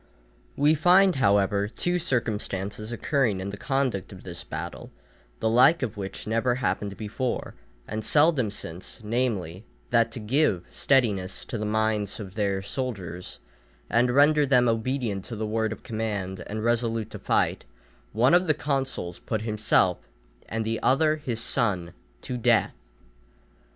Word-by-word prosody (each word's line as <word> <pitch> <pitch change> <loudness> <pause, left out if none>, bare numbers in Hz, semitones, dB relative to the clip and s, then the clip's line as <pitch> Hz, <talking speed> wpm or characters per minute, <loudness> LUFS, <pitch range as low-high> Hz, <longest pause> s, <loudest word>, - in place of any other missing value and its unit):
We 145 +2 +4
find, 180 +3 +5
however, 100 -3 +2
two 175 +10 -1
circumstances 105 - -2
occurring 120 -4 0
in 95 +1 -4
the - - -6
conduct 130 -4 -1
of 95 -2 -11
this 90 -2 -6
battle, 80 +2 -6 0.5
the - - +1
like 130 +8 +5
of 115 -4 -3
which 100 -1 -6
never 115 +3 +1
happened 105 -5 -2
before, 115 +4 -3 0.3
and 110 +1 -4
seldom 145 -6 +4
since, 90 0 -7
namely, 105 -6 -2 0.3
that 115 -1 +3
to - - -6
give 105 - +1
steadiness 105 -9 +1
to 120 - -4
the 105 - -2
minds 110 -1 0
of 95 -3 -8
their 100 -2 -1
soldiers, 100 -7 -5 0.5
and 120 +2 +3
render 145 +4 +5
them 125 -3 +4
obedient 115 -3 -1
to 115 - -6
the 110 0 -3
word 110 0 -1
of 110 - -7
command 105 -4 -3
and 110 +1 -4
resolute 115 -2 0
to - - -7
fight, - - +1 0.5
one 120 +7 +3
of 180 +1 +4
the 155 - +3
consuls 135 - -2
put 110 -1 -3
himself, 105 -4 +2 0.5
and 115 0 -2
the 115 0 -1
other 155 +3 +3
his 125 -7 -3
son, 95 -8 0 0.3
to 125 - -4
death. 120 - +3
110 Hz, 150 wpm, -26 LUFS, 100-130 Hz, 0.5 s, find